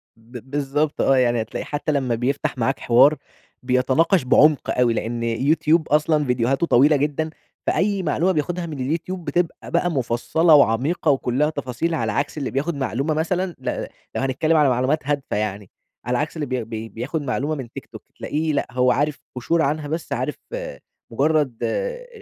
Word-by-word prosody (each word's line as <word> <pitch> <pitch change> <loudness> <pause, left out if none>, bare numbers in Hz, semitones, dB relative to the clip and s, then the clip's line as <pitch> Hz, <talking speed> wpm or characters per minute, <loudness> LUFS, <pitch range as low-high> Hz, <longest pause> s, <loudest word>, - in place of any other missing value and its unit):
ب 120 +3 -12
بالضبط 145 +1 -1
آه، 135 - +4
يعني 120 -2 +2
هتلاقي 110 - -5
حتّى 150 +1 -2
لمّا 130 -5 0
بيفتح 135 +4 -2
معاك 130 +3 0
حوار 135 +6 +5 0.5
بيتناقش 130 +7 +2
بعمق 145 +3 +3
أوي، 120 -2 +4
لأن 115 +1 -3
يوتيوب 150 +7 +2
أصلًا 150 0 +2
فيديوهاته 125 +5 +1
طويلة 145 +4 +5
جدًا، 150 +2 -1 0.4
فأي 195 0 +1
معلومة 180 +2 +1
بياخدها 175 +2 -2
من 155 -4 -6
اليوتيوب 165 +6 -3
بتبقى 175 -1 -2
بقى 175 +1 +1
مُفصَّلة، 140 +5 +2
وعميقة 145 +5 +3
وكلّها 135 +2 +1
تفاصيل، 140 +3 -2
على 110 -2 -1
عكس 145 +7 -2
اللي 140 - -3
بياخد 145 +5 -1
معلومة 135 +3 -1
مثلًا 175 +3 -1
ل - - -3 0.3
لو - - -1
هنتكلم 155 +5 +1
على 145 -3 +4
معلومات 130 +5 +1
هادفة 145 -7 -1
يعني، 105 -2 -3 0.4
على 125 0 0
عكس 150 +5 -2
اللي 150 - -2
بي 130 -2 -2
بي 110 0 -6
بياخد 140 +8 -4
معلومة 140 +3 -2
من 130 -5 -7
تيك - - -8
توك - - -12 0.2
تلاقيه 155 +1 -2
لأ، - - 0
هو 125 0 +3
عارف 145 +1 0 0.2
قُشور 160 +7 0
عنها 150 0 -1
بس، 160 +3 -4
عارف - - -2 0.8
مجرد 140 -1 +1
آآ، - - -2
145 Hz, 170 wpm, -22 LUFS, 125-155 Hz, 0.8 s, حوار